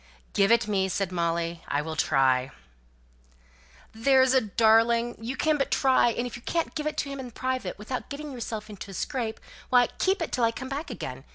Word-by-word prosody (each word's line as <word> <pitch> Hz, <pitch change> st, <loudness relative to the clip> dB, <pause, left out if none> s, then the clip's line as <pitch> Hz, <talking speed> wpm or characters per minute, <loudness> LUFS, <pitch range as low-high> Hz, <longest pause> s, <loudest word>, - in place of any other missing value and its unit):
"Give 200 Hz, +1 st, +3 dB
it 235 Hz, -2 st, +4 dB
me!" 190 Hz, -2 st, +1 dB
said 190 Hz, 0 st, -1 dB
Molly. 170 Hz, -1 st, -1 dB
"I 145 Hz, +1 st, 0 dB
will 160 Hz, 0 st, -5 dB
try." 130 Hz, -4 st, +2 dB, 1.4 s
"There's 260 Hz, +3 st, +4 dB
a 260 Hz, -, +5 dB
darling! 230 Hz, +3 st, +3 dB
You 245 Hz, +4 st, -4 dB
can 310 Hz, -1 st, +2 dB
but 275 Hz, -, 0 dB
try; 260 Hz, -3 st, +4 dB
and 235 Hz, +1 st, -2 dB
if 245 Hz, -, -6 dB
you 245 Hz, -, -9 dB
can't 330 Hz, +6 st, -2 dB
give 305 Hz, -1 st, -3 dB
it 305 Hz, -, -3 dB
to 280 Hz, -, -1 dB
him 275 Hz, 0 st, -6 dB
in 255 Hz, -2 st, -6 dB
private, 255 Hz, -5 st, -3 dB
without 245 Hz, +5 st, -5 dB
getting 290 Hz, +1 st, -6 dB
yourself 225 Hz, -4 st, -5 dB
into 205 Hz, -1 st, -9 dB
a 195 Hz, -, -8 dB
scrape, 230 Hz, +2 st, -3 dB, 0.3 s
why, 245 Hz, -1 st, +5 dB
keep 380 Hz, +2 st, +2 dB
it -, -, -5 dB
till 245 Hz, -, 0 dB
I 230 Hz, -, +5 dB
come 260 Hz, +2 st, -7 dB
back 290 Hz, +4 st, -4 dB
again. -, -, -6 dB
235 Hz, 205 wpm, -27 LUFS, 195-265 Hz, 1.4 s, a